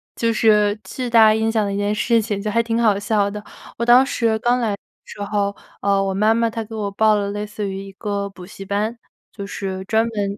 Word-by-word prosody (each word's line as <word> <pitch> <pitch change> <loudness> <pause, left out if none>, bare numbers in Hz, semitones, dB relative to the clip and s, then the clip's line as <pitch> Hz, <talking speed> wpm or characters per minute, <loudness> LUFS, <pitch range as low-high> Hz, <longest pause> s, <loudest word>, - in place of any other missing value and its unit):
就 230 -1 +1
是 210 -1 +3
巨 250 -2 -5
大 220 -2 +6
印 220 +1 0
象 215 -2 +1
的 200 - -2
一 - - -2
件 205 +1 0
事 230 +1 +2
情， 205 -2 -3
就 215 - -2
还 230 - +3
挺 230 0 -1
好 210 -3 +3
笑 205 -1 +1
的。 210 +1 -7 0.3
我 235 - -1
当 245 +2 +7
时 230 -4 0
刚 245 +2 +2
来 225 -3 0
的 200 - -3 0.3
时 205 - -10
候， 200 -1 -1 0.3
呃， 200 0 +2
我 195 -1 -1
妈 215 +3 +3
妈 230 0 +1
她 225 0 -4
给 225 +1 -9
我 205 -2 -3
报 215 +1 +3
了 200 -1 -1
类 205 +1 -4
似 210 -1 -5
于 195 0 -5
一 195 - -10
个 200 -1 -3
补 180 -2 -12
习 195 0 -10
班。 210 +4 -2 0.4
就 200 -2 -6
是 190 -1 -5
专 220 +3 +1
门 205 -2 -3
210 Hz, 265 characters per minute, -20 LUFS, 200-225 Hz, 0.4 s, 当